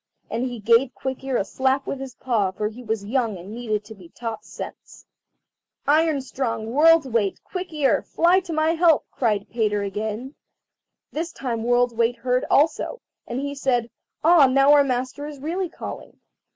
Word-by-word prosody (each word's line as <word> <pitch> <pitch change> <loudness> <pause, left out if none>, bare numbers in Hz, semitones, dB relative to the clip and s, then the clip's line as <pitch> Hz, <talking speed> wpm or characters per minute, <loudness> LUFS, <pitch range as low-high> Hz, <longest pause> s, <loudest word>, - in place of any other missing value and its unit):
And 235 - -1
he 245 -2 -4
gave 235 +4 +3
Quick 265 0 -5
ear 265 -2 0
a 195 - 0
slap 265 +4 0
with 275 - -4
his 265 -2 -7
paw, 230 -8 0
for 210 +3 -3
he 230 +3 -11
was 220 -3 -3
young 225 -3 0
and 185 +4 -9
needed 215 -3 -3
to 220 - -10
be 185 -5 -15
taught 225 +1 -6
sense. - - -10 0.8
"Iron 310 -1 +3
strong, 230 -4 -3
World's 320 +3 +6
weight, 225 -5 0
Quick 365 -2 -6
ear, 295 -4 +2
fly 350 +3 +3
to 375 -2 -8
my 315 0 +2
help!" 335 -2 +4
cried 210 -5 0
Peter 210 -3 0
again. 215 +6 -4 0.8
This 330 +2 -3
time 235 -4 -3
World's 245 +1 +2
weight 230 +1 +1
heard 250 +1 0
also, 320 - +2 0.3
and 240 +2 -3
he 285 0 -3
said, 245 -4 0 0.3
"Ah, 320 -3 +7
now 275 +2 +5
our 290 -1 +7
master 260 +2 -2
is 300 -1 -8
really 340 +6 -3
calling." - - -9
255 Hz, 180 wpm, -23 LUFS, 225-285 Hz, 0.8 s, Ah